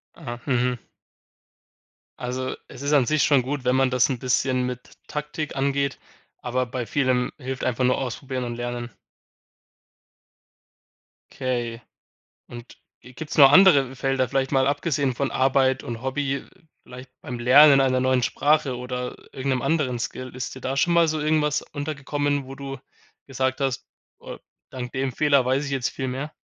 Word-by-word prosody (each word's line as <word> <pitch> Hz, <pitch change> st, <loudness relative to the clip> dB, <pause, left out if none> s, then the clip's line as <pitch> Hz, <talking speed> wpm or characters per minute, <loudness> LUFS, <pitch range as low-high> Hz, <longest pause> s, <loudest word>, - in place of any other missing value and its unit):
.Ah, 120 Hz, -7 st, -7 dB
mhm. 125 Hz, -1 st, +1 dB, 1.4 s
Also, 130 Hz, +1 st, -4 dB
es -, -, -11 dB
ist 140 Hz, +1 st, -1 dB
an 135 Hz, -4 st, +4 dB
sich 155 Hz, +2 st, +2 dB
schon 140 Hz, -3 st, +4 dB
gut, 135 Hz, +1 st, -4 dB
wenn 125 Hz, +1 st, +2 dB
man 135 Hz, -1 st, +3 dB
das 125 Hz, +2 st, +2 dB
'n 130 Hz, -, -2 dB
bisschen 130 Hz, 0 st, 0 dB
mit 125 Hz, 0 st, -8 dB
Taktik 150 Hz, 0 st, -5 dB
angeht, 140 Hz, 0 st, 0 dB, 0.4 s
aber 125 Hz, +1 st, -1 dB
bei 125 Hz, 0 st, -4 dB
vielem 130 Hz, -1 st, 0 dB
hilft 130 Hz, -1 st, -5 dB
einfach 125 Hz, 0 st, 0 dB
nur 125 Hz, 0 st, +3 dB
ausprobieren 130 Hz, 0 st, -4 dB
und 120 Hz, -1 st, -5 dB
lernen. 120 Hz, 0 st, -4 dB, 2.4 s
Okay 120 Hz, -3 st, -3 dB, 0.7 s
und 120 Hz, 0 st, -11 dB, 0.2 s
gi 125 Hz, -, -15 dB
gibt's 150 Hz, +4 st, -6 dB
noch 135 Hz, -1 st, +9 dB
andere 145 Hz, -9 st, +6 dB
Felder, 135 Hz, 0 st, 0 dB
vielleicht 135 Hz, +2 st, 0 dB
mal 135 Hz, -2 st, +2 dB
abgesehen 145 Hz, -2 st, 0 dB
von 135 Hz, +2 st, -1 dB
Arbeit 130 Hz, 0 st, +2 dB
und 120 Hz, 0 st, -6 dB
Hobby, 135 Hz, +1 st, -2 dB, 0.4 s
vielleicht 125 Hz, +1 st, -12 dB
beim 120 Hz, 0 st, -6 dB
Lernen 135 Hz, +4 st, +7 dB
einer 130 Hz, -1 st, +2 dB
neuen 130 Hz, -1 st, +2 dB
Sprache 145 Hz, 0 st, +1 dB
oder 125 Hz, 0 st, -5 dB, 0.2 s
irgend 135 Hz, +1 st, -3 dB
'nem 125 Hz, -, -2 dB
anderen 135 Hz, -4 st, 0 dB
Skill? 130 Hz, +2 st, -5 dB
Ist 125 Hz, 0 st, -5 dB
dir -, -, -9 dB
da 130 Hz, +1 st, -3 dB
schon 170 Hz, +5 st, +2 dB
mal 170 Hz, -1 st, +5 dB
so 155 Hz, -1 st, -1 dB
irgendwas 150 Hz, -1 st, +1 dB
untergekommen, 145 Hz, -1 st, -3 dB
wo 135 Hz, -, -8 dB
du 135 Hz, 0 st, -7 dB, 0.5 s
gesagt 130 Hz, 0 st, -2 dB
hast, 135 Hz, -1 st, -2 dB, 0.3 s
äh, -, -, -9 dB, 0.3 s
dank 125 Hz, -1 st, -6 dB
dem 135 Hz, -1 st, -2 dB
Fehler 140 Hz, 0 st, +3 dB
weiß 130 Hz, +3 st, +1 dB
ich 140 Hz, -, -5 dB
jetzt 135 Hz, -3 st, -1 dB
viel 130 Hz, -1 st, -4 dB
mehr. 135 Hz, +4 st, -5 dB
130 Hz, 165 wpm, -24 LUFS, 125-140 Hz, 2.4 s, noch